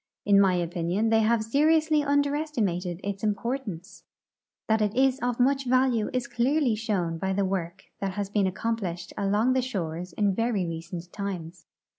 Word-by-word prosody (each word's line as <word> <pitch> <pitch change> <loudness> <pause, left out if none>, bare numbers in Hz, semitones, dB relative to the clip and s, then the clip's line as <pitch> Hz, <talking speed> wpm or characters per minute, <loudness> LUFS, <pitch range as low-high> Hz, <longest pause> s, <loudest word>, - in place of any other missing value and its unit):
In 200 -1 +6
my 190 -2 +4
opinion 175 +4 0
they 225 0 +4
have 220 0 +2
seri 295 +8 +4
ously 310 -1 +2
underestimated 285 - 0
its 200 0 -4
importance. 210 -4 -3 0.6
That 220 0 +2
it 210 0 0
is 265 +1 +3
of 245 -1 -2
much 270 +1 +2
A^alue 255 -3 +2
is 250 -2 -1
clearly 260 +1 +1
shoAvn 185 -7 -2
by 190 +1 -1
the 200 +1 +1
AVork 185 -1 -3 0.2
that 195 -1 -2
has 200 0 -2
been 200 -1 +1
accomplished 185 -4 -3
along 210 +5 +2
the 260 - +2
shores 180 -7 -4
in 205 0 +1
very 225 -3 0
recent 170 +1 -6
times. 180 -4 -6
210 Hz, 165 wpm, -27 LUFS, 180-250 Hz, 0.6 s, In